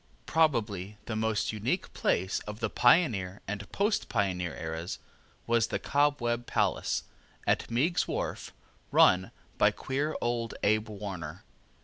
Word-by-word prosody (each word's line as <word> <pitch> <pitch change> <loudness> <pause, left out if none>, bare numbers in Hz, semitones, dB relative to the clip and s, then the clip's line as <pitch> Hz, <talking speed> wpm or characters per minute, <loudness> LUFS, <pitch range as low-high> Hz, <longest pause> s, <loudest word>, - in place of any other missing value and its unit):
Probably 105 - +1
the 115 - -3
most 110 -1 0
unique 120 - -2
place 95 +2 +1
of 105 +1 -6
the 115 - -1
pioneer 115 - +3
and 100 0 -5
post 205 +2 0
pioneer 90 -4 0
eras 80 +2 -4 0.5
was 115 -1 +2
the - - -1
Cobweb 125 -5 +1
Palace, - - 0 0.4
at - - +1
Meiggs's 145 +10 +1
Wharf, - - -3 0.4
run 95 0 +5 0.3
by - - +6
queer 145 +4 -2
old 120 -1 -1
Abe 110 +1 +2
Warner. 95 -6 -6
110 Hz, 125 wpm, -30 LUFS, 95-125 Hz, 0.5 s, by